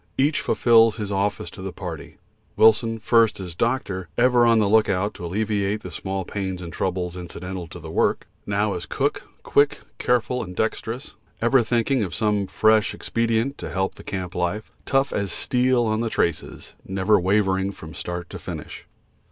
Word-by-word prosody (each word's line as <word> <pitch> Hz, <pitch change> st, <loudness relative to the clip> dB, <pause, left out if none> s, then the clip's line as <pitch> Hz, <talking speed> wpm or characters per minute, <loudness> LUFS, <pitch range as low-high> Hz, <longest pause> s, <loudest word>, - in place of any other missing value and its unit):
Each 145 Hz, +3 st, +2 dB
fulfils 115 Hz, -2 st, +4 dB
his 105 Hz, -2 st, -4 dB
office 100 Hz, +1 st, -1 dB
to -, -, -10 dB
the 95 Hz, 0 st, -4 dB
party; -, -, -8 dB, 0.4 s
Wilson, 110 Hz, +1 st, +4 dB
first 115 Hz, -1 st, +3 dB
as 90 Hz, -3 st, -6 dB
doctor, 95 Hz, -4 st, -1 dB
ever 120 Hz, -1 st, +5 dB
on 115 Hz, -1 st, +5 dB
the 105 Hz, -2 st, +3 dB
lookout 100 Hz, -1 st, +2 dB
to 85 Hz, -, -8 dB
alleviate 105 Hz, +1 st, -1 dB
the 90 Hz, -, -7 dB
small 95 Hz, +3 st, -4 dB
pains 95 Hz, -2 st, -4 dB
and 85 Hz, -2 st, -8 dB
troubles 90 Hz, -1 st, -2 dB
incidental 90 Hz, 0 st, -6 dB
to -, -, -10 dB
the -, -, -8 dB
work, -, -, +1 dB, 0.2 s
now 100 Hz, 0 st, +1 dB
as 90 Hz, -, -5 dB
cook, -, -, -1 dB, 0.2 s
quick, 145 Hz, 0 st, +2 dB, 0.2 s
careful 125 Hz, +1 st, +1 dB
and 90 Hz, -3 st, -7 dB
dexterous, 115 Hz, -, -3 dB, 0.3 s
ever 120 Hz, +2 st, +4 dB
thinking 120 Hz, +3 st, +1 dB
of 90 Hz, -, -4 dB
some 105 Hz, -3 st, +1 dB
fresh 110 Hz, 0 st, +3 dB
expedient 115 Hz, +4 st, -1 dB
to -, -, -5 dB
help 95 Hz, 0 st, -1 dB
the -, -, -13 dB
camp 95 Hz, -2 st, -5 dB
life; 90 Hz, +5 st, -2 dB, 0.2 s
tough 135 Hz, 0 st, +2 dB
as 100 Hz, -2 st, -1 dB
steel 125 Hz, -1 st, +2 dB
on 110 Hz, 0 st, 0 dB
the 115 Hz, -, -1 dB
traces, 85 Hz, -6 st, -2 dB
never 95 Hz, +2 st, +2 dB
wavering 95 Hz, 0 st, +1 dB
from 80 Hz, -4 st, -11 dB
start 90 Hz, +3 st, -5 dB
to -, -, -7 dB
finish. -, -, -8 dB
105 Hz, 175 wpm, -23 LUFS, 95-115 Hz, 0.4 s, ever